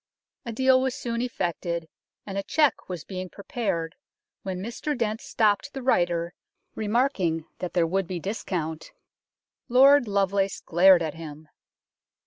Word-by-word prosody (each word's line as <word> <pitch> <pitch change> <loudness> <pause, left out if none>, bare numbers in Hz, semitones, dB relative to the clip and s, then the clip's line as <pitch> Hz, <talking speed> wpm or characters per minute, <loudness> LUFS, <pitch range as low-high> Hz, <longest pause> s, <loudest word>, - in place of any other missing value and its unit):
A - - -2
deal 260 +2 +4
was 260 -1 -1
soon 235 -1 -3
effected, 170 -8 -2 0.4
and 195 - -6
a 195 - 0
cheque 300 +3 +1
was 175 -4 -5
being 185 -1 -6
prepared 180 -6 -3 0.5
when 190 -2 -4
Mr 235 +9 -4
Dent 220 -2 -1
stopped 215 +5 +1
the 270 -2 -6
writer, 175 -8 +1 0.4
remarking 210 - 0
that 180 -1 -4
there 175 -2 +3
would 190 +2 -1
be 180 -1 -4
discount. 165 -5 -4 0.8
Lord 270 +1 +6
Lovelace 200 -1 +1
glared 175 +1 +5
at 155 -2 -3
him. 155 -2 -10
195 Hz, 135 wpm, -26 LUFS, 170-235 Hz, 0.8 s, Lord